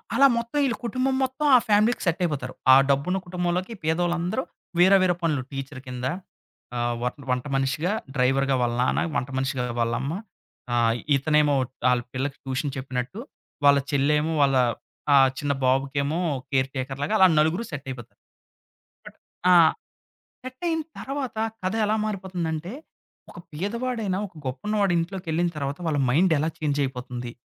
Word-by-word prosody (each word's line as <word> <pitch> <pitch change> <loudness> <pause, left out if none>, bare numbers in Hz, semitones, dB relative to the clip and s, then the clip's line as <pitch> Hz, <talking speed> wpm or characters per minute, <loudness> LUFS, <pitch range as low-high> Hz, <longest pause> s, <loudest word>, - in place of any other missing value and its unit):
అలా 275 0 +7
మొత్తం 235 +5 -3
ఈళ్ళ 235 -4 0
కుటుంబం 260 +2 0
మొత్తం, 265 +4 -2
ఆ - - +10
ఫ్యామిలీకి 215 +3 +3
సెట్ 175 0 +1
అయిపోతారు. 135 -6 -2 0.2
ఆ - - +10
డబ్బున్న 145 +8 +1
కుటుంబంలోకి 180 +4 -2
పేదవాళ్ళందరూ 175 +7 0 0.4
వేరే, 190 +2 +7
వేరే 180 -2 +3
పనులు 150 -5 +1
టీచర్ 135 -1 -6
కింద, 125 0 -5 0.7
ఆహ్, 120 0 0
వ - - -2 0.2
వంట 125 +1 0
మనిషిగా, 135 +7 0 0.2
డ్రైవర్‌గా 135 +1 +2
వాళ్ళ 120 -1 +1
నాన్న, 130 - +1
వంట 125 +3 -1
మనిషిగా 130 -1 -1 0.2
వాళ్ళమ్మ, 120 +5 -1 0.6
ఆహ్, 115 -1 +3 0.2
ఇతనేమో 150 +1 +3 0.4
ఆళ్ళ 125 -1 +2
పిల్లకి 135 +2 -3
ట్యూషన్ 135 +1 -2
చెప్పినట్టు. 130 - -4 0.5
వాళ్ళ 140 0 +7
చెల్లేమో 150 +3 +2
వాళ్ళ 135 -1 +4 0.6
ఆహ్, 135 -1 +6
చిన్న 145 -1 0
బాబుకేమో 140 +4 +1 0.3
కేర్ 135 0 +1
టేకర్‌ 135 +1 -4
లాగా 215 - -1
అలా 190 - +8
నలుగురు 160 +9 +2
సెట్ 140 -1 -6
అయిపోతారు. 120 -3 -9 0.9
కట్ - - -12 0.4
ఆ! - - +7 0.9
సెట్ 255 +5 -9
అయిన 325 -1 0 0.2
తర్వాత, 270 -4 -4 0.3
కథ 185 - -1
ఎలా 215 +1 +1
మారిపోతుందంటే, 180 -3 -3 0.6
ఒక - - -11
పేదవాడైనా 215 +2 -2
ఒక 175 - -24
గొప్పున్నవాడు 200 +8 0
ఇంట్లోకెళ్ళిన 175 -1 -1
తర్వాత, 140 0 -3
వాళ్ళ 150 -2 0
మైండ్ 165 +6 +4
ఎలా 160 +2 0
చేంజ్ 145 -2 0
అయిపోతుంది. 125 -2 -6
150 Hz, 145 wpm, -25 LUFS, 135-190 Hz, 0.9 s, ఆ